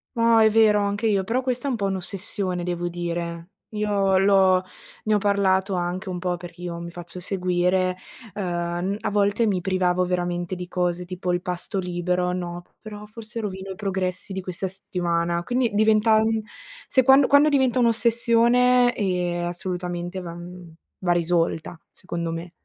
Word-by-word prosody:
No 230 -1 +4
è 220 0 +6
vero 215 -1 +4
anche 205 +2 -1
io, 200 -3 +2
però 230 +7 0
questa 255 +1 -2
è - - +1
un - - 0
po' 200 - -1
un'ossessione, 190 -1 -3
devo 175 0 -2
dire. 170 0 -4 0.2
Io 205 -3 +1
l'ho 190 -1 +4 0.4
ne 215 - +1
ho - - +5
parlato 195 -1 +2
anche 180 +3 -3
un 180 - -3
po' 180 0 -1
perché 175 0 -11
io 170 -1 -5
mi 170 0 -6
faccio 175 +1 -8
seguire, 185 0 0 0.4
ehm, 205 - -4 0.5
n - - -4
a 215 - -2
volte 205 +2 +2
mi 200 -4 +1
privavo 185 -1 +1
veramente 175 0 -2
di 180 0 -6
cose 180 -1 -1
tipo 180 0 -3
il 175 - 0
pasto 180 +3 -4
libero, 180 0 -1
no: 175 -1 -4 0.2
"Però 210 -1 -9
forse 225 +2 -8
rovino 190 -2 -5
i - - -6
progressi 190 -1 -3
di 190 - -3
questa 185 +1 -4
settimana." 170 -2 -2
Quindi 245 +4 +1
diventa 215 +1 +4
mhmm, 220 0 0 0.5
se 260 - +3
quando 270 +1 +6
quando 285 +2 +6
diventa 265 -3 +2
un'ossessione, 240 +1 +3
ehm, 180 -3 -1
assolutamente 175 0 -4
va 170 -2 -7
mhmm, 175 -1 -10 0.3
va 180 -2 0
risolta, 170 -1 0 0.2
secondo 170 -2 -4
me. 165 +1 -6
185 Hz, 170 wpm, -24 LUFS, 175-215 Hz, 0.5 s, è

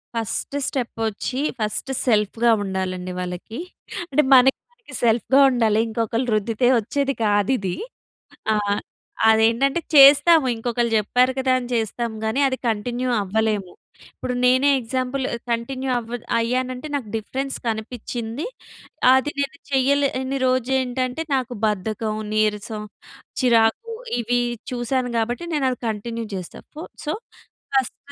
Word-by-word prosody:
First step 255 +3 -2
వచ్చి 220 +4 -3 0.2
first 215 +5 -2
సెల్ఫ్‌గా 225 +1 +2
ఉండాలండి 185 -1 -3
వాళ్ళకి. 180 +6 -5 0.5
అంటే 300 +3 +4
మనకి 270 - +2
సెల్ఫ్‌గా 235 +3 +3
ఉండాలి. 225 -4 +2
ఇంకొకళ్ళు 230 +2 -1
రుద్దితే 225 +3 +1
వచ్చేది 275 +5 -1
కాదిది. 205 -2 +1 0.8
ఆహ్, 205 -1 0 0.5
అదేంటంటే 230 +8 +3
చేస్తాము 285 +2 +8
ఇంకొకళ్ళు 235 0 -1
చెప్పారు 250 +5 +2
కదా! 260 0 +1
అని 245 - -7
చేస్తాం 230 +1 -1
గాని 220 +5 0
అది 260 - -2
కంటిన్యూ 240 +4 -2
అవ్వలేము. 205 -2 -1 0.4
ఇప్పుడు 250 - -4
నేనే 260 +3 +4
ఎగ్జాంపుల్ 255 +2 -2 0.3
కంటిన్యూ 255 +3 -2
అవ్వ 235 +1 -5 0.2
అయ్యానంటే 255 +4 -2
నాకు 260 -6 -3
డిఫరెన్స్ 265 +5 -4
కనిపిచ్చిం‌ది. 230 +3 -4 0.7
అది 265 +3 +2
నేను 280 +3 -2
చెయ్యలేని 270 0 +1
రోజు 255 -1 +1
ఏంటంటే 255 +4 -2
నాకు 255 -1 -2
బద్ధకం, 215 +1 -2 0.2
నీరసం, 215 0 -1 0.6
చిరాకు 235 - +2 0.3
ఇవి 240 +1 +1 0.3
చూసాను 245 0 -1
కాబట్టి 240 +6 -1
నేను 290 -3 +1
అది 250 - -4
కంటిన్యూ 230 +2 -4
చేస్తా. 180 -2 -7 0.2
ఫో 315 - -6 0.2
సో, 300 - -1 0.6
ఫస్ట్ 265 -4 +1
240 Hz, 115 wpm, -22 LUFS, 220-260 Hz, 0.8 s, చేస్తాము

